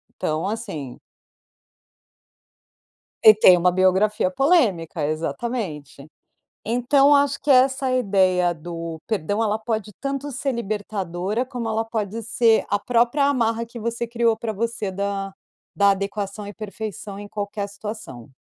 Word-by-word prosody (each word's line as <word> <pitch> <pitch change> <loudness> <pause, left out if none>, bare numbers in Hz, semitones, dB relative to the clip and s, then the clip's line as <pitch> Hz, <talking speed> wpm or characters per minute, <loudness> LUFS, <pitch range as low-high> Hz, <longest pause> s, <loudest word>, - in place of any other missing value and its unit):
Então 155 +4 -2
assim. 195 - -5 2.2
E 215 -1 +9
tem 185 -4 +7
uma 180 +1 +3
biografia 190 +7 +2
polêmica, 220 - +2
exatamente. 155 - -4 0.6
Então 245 +5 +3
eu - - +7
acho 280 -1 +2
que 295 - -10
essa 265 0 +4
ideia 190 -7 +2
do 165 0 -7
perdão 205 +1 -1
ela 215 0 0
pode 220 -2 -3
tanto 275 +1 -3
ser 275 +2 -2
libertadora 205 -1 -3
como 245 -4 -5
ela 220 +1 0
pode 220 -1 -3
ser 230 0 +3
a 205 - +1
própria 245 +5 +2
amarra 230 -4 +1
que 235 +1 -10
você 235 +1 -3
criou 230 -1 +1
para 225 0 -4
você 220 -1 -3
da 195 0 -3 0.4
da 200 0 +4
adequação 200 +1 -3
e - - -7
perfeição 210 -1 -7
em 205 - -9
qualquer 205 0 -4
situação. 200 - -8
215 Hz, 135 wpm, -23 LUFS, 190-235 Hz, 2.2 s, E